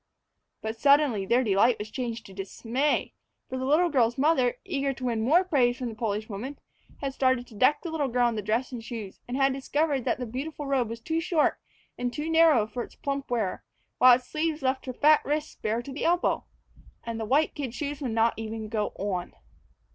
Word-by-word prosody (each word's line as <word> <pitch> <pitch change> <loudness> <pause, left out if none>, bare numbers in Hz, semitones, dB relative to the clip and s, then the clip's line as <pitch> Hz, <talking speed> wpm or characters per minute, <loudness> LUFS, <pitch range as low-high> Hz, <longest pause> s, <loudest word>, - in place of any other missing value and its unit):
But 220 +1 -3
suddenly 280 -8 +4
their 245 +4 +3
delight 220 +2 +3
was 210 +1 -7
changed 235 -2 -4
to 195 - -12
dismay. 230 +9 -1 0.3
For 260 - -4
the 260 - -2
little 320 +6 +3
girl's 240 -4 +2
mother, 265 -4 +3
eager 280 -7 -1
to 260 - -10
win 230 -3 0
more 310 +11 +4
praise 255 -9 +2
from 250 -2 -3
the 225 - -8
Polish 215 -1 -2
woman, 240 +7 -6 0.4
had 275 -1 -2
started 260 -2 +1
to 240 - -17
deck 255 +7 +3
the 340 - -4
little 305 -3 0
girl 245 -1 +2
in 235 - 0
the 215 - -2
dress 225 +6 -1
and 240 -3 -6
shoes, 220 -5 -7
and 245 +2 -3
had 270 -1 +3
discovered 280 0 0
that - - +1
the 250 - -4
beautiful 285 +6 -5
robe 265 -5 +1
was 230 0 -6
too 320 +6 -1
short 330 -3 +1 0.4
and 245 0 -1
too 305 +4 -3
narrow 320 -9 +5
for 220 +3 -5
its - - -9
plump 275 -1 -4
wearer, 225 -6 -1 0.4
while 250 -1 +9
its 250 0 -7
sleeves 310 -1 -2
left 265 0 -1
her 255 - -3
fat 300 +4 +4
wrists 300 +1 -2
bare 225 +2 -2
to 270 - -8
the 285 - -4
elbow. 345 +1 +1 0.6
And 230 -1 -4
the 220 - -2
white 285 +8 +2
kid 265 -5 -5
shoes 290 -1 -4
would 265 - -2
not 225 +1 +2
even 220 -1 -5
go 210 -2 -1
on! 190 -3 -3
255 Hz, 215 wpm, -27 LUFS, 225-290 Hz, 0.6 s, while